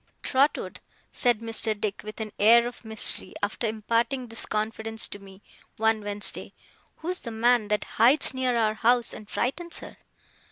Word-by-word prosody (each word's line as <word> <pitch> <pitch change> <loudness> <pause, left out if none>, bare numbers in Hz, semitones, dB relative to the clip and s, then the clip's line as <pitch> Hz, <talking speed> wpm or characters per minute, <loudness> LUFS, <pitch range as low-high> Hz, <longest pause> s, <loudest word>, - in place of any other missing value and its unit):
'Trotwood,' 275 +3 0 0.3
said 240 -3 +1
Mr. 225 -2 0
Dick, 210 -2 -3
with 215 +1 -9
an 215 -1 -5
air 235 +3 +6
of 240 - -10
mystery, 220 -1 +1
after 210 +3 -1
imparting 230 +4 -1
this 230 -1 -3
confidence 220 +1 -2
to 205 - -9
me, 195 0 -15 0.3
one 220 0 +2
Wednesday; 205 0 0 0.4
'who's 360 +3 -4
the 235 - -7
man 230 0 +2
that 210 0 0
hides 255 +7 +4
near 255 -2 0
our 220 -2 +2
house 235 +2 +2
and 215 -1 -11
frightens 340 +7 -2
her? - - -11
225 Hz, 160 wpm, -26 LUFS, 215-240 Hz, 0.4 s, air